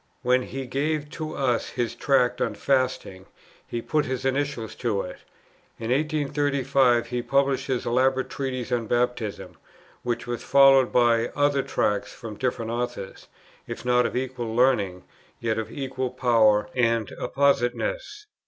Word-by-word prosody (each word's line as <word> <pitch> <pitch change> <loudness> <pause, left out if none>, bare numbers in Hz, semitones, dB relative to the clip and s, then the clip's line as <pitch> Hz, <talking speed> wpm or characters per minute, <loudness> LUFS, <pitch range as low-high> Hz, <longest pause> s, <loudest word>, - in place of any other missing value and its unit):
When 125 0 +3
he 135 +1 -6
gave 145 +3 -2
to 155 -1 -5
us 125 -4 0
his 120 -2 -2
Tract 125 -3 +1
on 110 - 0
Fasting, 125 -6 -1 0.4
he 120 -1 -4
put 155 -1 0
his 130 0 -3
initials 135 -4 -1
to 110 -5 -1
it. 90 - -8 0.6
In 115 +1 -4
1835 140 -4 +2
he 125 0 -2
published 135 +1 +1
his 130 -3 -1
elaborate 130 +2 +2
Treatise 130 -2 -4
on 120 -2 0
Baptism, 120 -3 -2 0.4
which 120 -1 -2
was 120 -1 -4
followed 135 -2 +6
by 120 -1 +3
other 145 -1 +2
Tracts 105 -5 -1
from 115 -3 -8
different 115 -2 -2
authors, 120 -5 -5 0.4
if - - -7
not 125 0 +3
of - - -7
equal 125 -3 -3
learning, 100 -8 +2 0.4
yet 110 -1 -1
of 110 -1 -5
equal 130 -2 -3
power 115 -5 +3
and 115 -4 +1
appositeness. 415 - 0
125 Hz, 145 wpm, -25 LUFS, 115-135 Hz, 0.6 s, followed